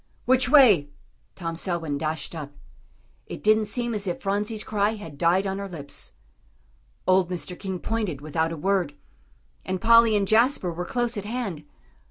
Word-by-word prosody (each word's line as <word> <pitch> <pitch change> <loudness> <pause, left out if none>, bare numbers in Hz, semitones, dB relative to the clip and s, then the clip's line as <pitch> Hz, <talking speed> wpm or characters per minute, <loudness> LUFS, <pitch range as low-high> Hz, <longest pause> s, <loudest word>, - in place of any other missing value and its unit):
"Which 255 -1 +3
way?" 220 - +6 0.5
Tom 165 -2 -4
Selwyn 165 -4 -2
dashed 155 +1 -3
up. 145 -3 -7 0.7
It - - -8
didn't 215 0 +4
seem 235 +3 0
as 205 -2 -3
if 175 - -2
Phronsie's 210 +2 -2
cry 210 0 0
had 165 -9 -9
died 175 +6 +2
on 195 0 -2
her 200 - -4
lips. 150 -5 -7 0.9
Old 185 -1 +3
Mr. 180 0 -4
King 190 -2 -4
pointed 210 -7 -2
without 160 +2 -1
a 165 - -5
word. 180 -3 0 0.7
And 185 0 -3
Polly 230 0 +6
and 200 -1 0
Jasper 220 -4 +2
were 175 +2 -4
close 240 0 -1
at 205 - -5
hand. 205 -10 -4
195 Hz, 165 wpm, -25 LUFS, 165-220 Hz, 0.9 s, way